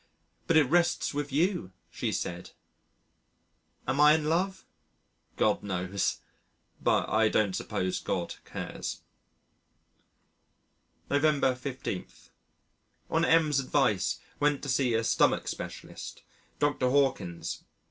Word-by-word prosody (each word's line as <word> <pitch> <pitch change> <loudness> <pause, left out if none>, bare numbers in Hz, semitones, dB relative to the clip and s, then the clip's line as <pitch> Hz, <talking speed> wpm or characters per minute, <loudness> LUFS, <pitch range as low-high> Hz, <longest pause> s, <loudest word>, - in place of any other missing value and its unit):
but 165 - +4
it 155 - +7
rests 175 +2 +2
with 145 0 -3
you," 155 - 0 0.2
she - - -2
said. 90 +1 -4 1.4
Am 135 +3 0
I 150 +1 +8
in 155 -1 -1
love? 185 +5 0 0.7
God - - +2
knows 95 -1 -2 0.6
but - - +2
I 110 +1 +3
don't 105 -3 +2
suppose 95 0 -2
God - - -2
cares. - - -6 2.1
November 145 -2 +3
15. 125 -7 -5 1.0
On 160 - +2
M 160 -2 +4
's 140 - +3
advice 130 -8 +1 0.2
went 145 -1 +1
to 145 - -4
see 125 -2 +2
a 115 - +1
stomach - - +2
specialist - - -7 0.3
Dr. 145 -3 +1
Hawkins. 125 -11 0
135 Hz, 110 wpm, -29 LUFS, 105-150 Hz, 2.1 s, I